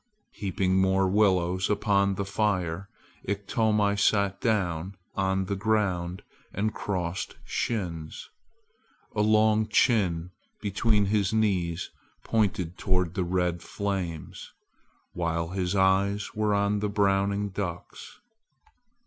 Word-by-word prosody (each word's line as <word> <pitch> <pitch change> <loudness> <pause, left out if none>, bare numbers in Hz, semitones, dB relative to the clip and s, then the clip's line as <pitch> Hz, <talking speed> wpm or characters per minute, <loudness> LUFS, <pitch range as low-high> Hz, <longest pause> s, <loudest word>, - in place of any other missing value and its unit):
Heaping 95 -2 0
more 95 0 +3
willows 95 -2 +2
upon 100 -1 +2
the 100 - -2
fire, 95 -3 -1 0.4
Iktomi 105 +1 +1
sat 100 -1 +2
down 95 -5 0 0.2
on 95 0 0
the 100 +1 -2
ground 95 -4 0 0.3
with 105 +2 0
crossed 90 -2 -3
shins. 85 -9 -3 0.9
A - - +2
long 110 0 +4
chin 95 -7 +2 0.3
between 105 +1 +1
his 100 -1 +1
knees 95 -5 0 0.3
pointed 100 -6 0
toward 90 -3 0
the 95 -1 -1
red 90 -1 0
flames, 95 -5 -4 0.6
while 85 -1 -1
his 95 0 -1
eyes 100 +1 +2
were 105 -1 +1
on 100 +1 +1
the 105 0 -1
browning 100 0 +1
ducks. 90 -3 -6
100 Hz, 105 wpm, -27 LUFS, 90-105 Hz, 0.9 s, long